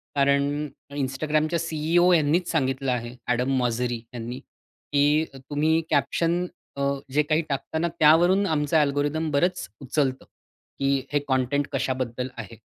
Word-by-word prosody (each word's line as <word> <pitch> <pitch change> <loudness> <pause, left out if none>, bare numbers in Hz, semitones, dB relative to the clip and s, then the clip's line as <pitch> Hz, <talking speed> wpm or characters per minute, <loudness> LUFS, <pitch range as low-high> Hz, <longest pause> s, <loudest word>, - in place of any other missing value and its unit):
कारण 140 +1 +2 0.3
Instagramच्या 155 +4 0
सी-ई-ओ 165 +2 +2
यांनीच 165 +2 +2
सांगितलं 135 -3 0
आहे. 120 0 -3 0.2
एडम 125 +2 +1
मॉझरी 120 0 0 0.2
यांनी, 120 +2 -6
की 145 +2 -1
तुम्ही 150 +4 0
कॅप्शन 170 +4 +1 0.3
अ, 140 - -1 0.3
जे 150 - +4
काही 155 +2 +1
टाकतां 140 +3 -2
ना 170 - +1
त्यावरून 175 +6 +5
आमचं 155 -2 +1
अल्गोरिदम 145 +2 +1
बरंच 160 - 0
उचलतं, 135 0 -1 0.5
की 135 0 +1 0.2
हे 145 - +2
कंटेंट 130 +2 +1
कशाबद्दल 130 -1 -2
आहे. 110 0 -8
145 Hz, 125 wpm, -25 LUFS, 130-160 Hz, 0.5 s, त्यावरून